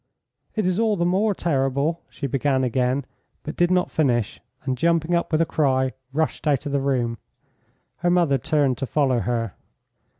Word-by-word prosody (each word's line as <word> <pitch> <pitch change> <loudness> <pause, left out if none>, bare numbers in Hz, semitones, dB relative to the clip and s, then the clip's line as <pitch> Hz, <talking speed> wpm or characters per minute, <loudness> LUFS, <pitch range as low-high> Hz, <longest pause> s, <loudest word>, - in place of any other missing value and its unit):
"It 215 -3 0
is 185 +2 +1
all 220 -2 +2
the 175 -2 0
more 195 +4 +2
terrible 140 +1 0
" - - -42
she 140 - -6
began 135 0 +1
again, 125 +2 0 0.4
but 155 - -6
did 175 0 +2
not 180 -1 +1
finish, 120 -8 0 0.2
and 130 -2 -1
jumping 165 +4 +1
up 170 0 0
with 155 0 +3
a - - +3
cry 130 -5 +1 0.2
rushed 155 +2 -1
out 145 -1 +1
of 145 - -3
the 140 -1 +1
room. 120 -5 0 0.8
Her 175 - 0
mother 170 -6 +3
turned 145 -2 +1
to 135 - -2
follow 135 -4 +2
her. 115 -3 -2
145 Hz, 180 wpm, -23 LUFS, 130-170 Hz, 0.8 s, with